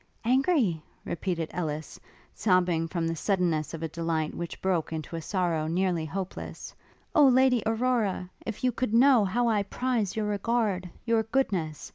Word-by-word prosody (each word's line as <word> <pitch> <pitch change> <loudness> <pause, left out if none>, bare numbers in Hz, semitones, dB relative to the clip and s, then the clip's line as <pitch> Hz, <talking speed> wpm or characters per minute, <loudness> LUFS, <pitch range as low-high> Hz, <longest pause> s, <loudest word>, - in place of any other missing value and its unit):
'Angry?' 255 - +2 0.2
repeated 170 -2 -3
Ellis, 155 -3 -4 0.3
sobbing 180 -5 +2
from 170 -1 -2
the 165 - -1
suddenness 165 -4 0
of 165 - -7
a - - 0
delight 160 -1 -2
which 170 -1 -6
broke 180 -5 0
into 160 +1 -5
a 165 - -4
sorrow 170 -4 -1
nearly 175 -1 0
hopeless; 190 +4 -6 0.4
'O 300 -4 +7
Lady 255 -2 +4
Aurora! 225 -5 0 0.2
if 225 +1 -6
you 255 - +3
could 235 -1 -1
know 255 -2 +6
how 235 +5 +1
I 215 -3 +2
prize 225 0 -1
your 215 -1 -1
regard! 205 -3 0 0.2
your 230 -1 +3
goodness! 195 - -1
190 Hz, 155 wpm, -28 LUFS, 165-230 Hz, 0.4 s, O